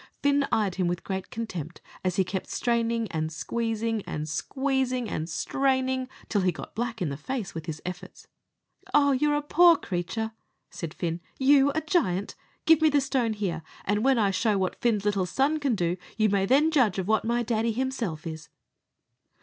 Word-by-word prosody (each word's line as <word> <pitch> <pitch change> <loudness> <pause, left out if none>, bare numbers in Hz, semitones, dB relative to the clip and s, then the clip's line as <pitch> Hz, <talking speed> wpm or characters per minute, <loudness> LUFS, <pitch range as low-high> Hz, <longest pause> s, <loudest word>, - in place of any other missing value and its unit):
Fin 285 0 +3
eyed 205 -4 +2
him 185 -2 +1
with 175 0 -2
great 190 -1 -4
contempt, 175 -8 -5 0.2
as 185 -1 0
he 190 - +3
kept 185 +1 -4
straining 230 -1 0
and 155 -1 -2
squeezing 225 +4 -2
and 150 0 -3
squeezing 260 - -1
and 160 -4 -3
straining, 260 +7 0 0.2
till 205 - +1
he 185 -1 +2
got - - -9
black 235 -2 -2
in 160 - -1
the 140 - -3
face 230 - -4
with 160 -1 -6
the 155 -2 -5
efforts. 180 +1 -8 0.7
"Ah, 285 -1 +5
you're 295 +3 +2
a 295 - -1
poor 340 +3 +6
creature!" 210 +4 -3 0.4
said 165 -3 -5
Fin. 170 -1 -3 0.2
"You 275 +1 +5
a 315 - +1
giant! 205 - 0 0.3
Give 325 -1 +6
me 315 - +6
the 290 -1 +3
stone 260 -5 0
here, 190 -6 -2 0.2
and 205 +2 +1
when 270 -1 +4
I'll 205 -3 +3
show 210 +2 +1
what 190 -1 -2
Fin's 215 -4 +1
little 200 -3 +1
son 275 - +1
can 275 -5 +1
do; 175 -2 0 0.2
you 215 -1 +3
may 195 -1 +1
then 295 +6 +4
judge 250 - +3
of 190 -1 -2
what 220 0 +2
my 235 +1 +1
daddy 230 0 0
himself 230 -10 -3
is." 160 -1 -7
220 Hz, 190 wpm, -27 LUFS, 185-265 Hz, 0.7 s, poor